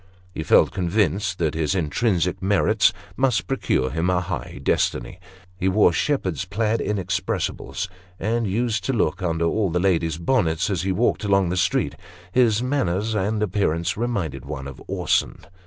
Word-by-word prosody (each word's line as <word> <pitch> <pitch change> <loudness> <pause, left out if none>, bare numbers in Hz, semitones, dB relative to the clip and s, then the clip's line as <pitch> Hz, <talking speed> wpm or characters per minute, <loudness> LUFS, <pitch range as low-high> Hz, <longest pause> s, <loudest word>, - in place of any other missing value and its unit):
He - - -4
felt 80 - +4
convinced 95 +1 0
that 80 -3 0
his 80 +3 0
intrinsic 90 +2 0
merits 100 +1 +3 0.2
must 130 -2 +1
procure 65 - 0
him 80 +4 0
a 90 -1 +2
high 90 - -5
destiny. - - 0 0.4
He 95 +1 0
wore 95 -2 +4
shepherd's 95 - 0
plaid 105 +4 -1
inexpressibles, 95 -1 -2 0.3
and 115 +2 0
used 115 +3 0
to 135 - 0
look 110 -3 0
under 85 -2 0
all 100 +3 +1
the 90 +2 0
ladies' 85 -4 +1
bonnets 85 -2 +1
as 90 -4 0
he 95 +1 -1
walked 110 +4 +1
along 100 -3 +2
the 90 - -1
streets. 95 - 0 0.3
His 120 0 +3
manners 110 -6 0
and 105 +1 0
appearance 90 -5 0
reminded 100 - -2
one 65 +1 -6
of 65 - -10
Orson. - - 0
95 Hz, 155 wpm, -23 LUFS, 85-110 Hz, 0.4 s, felt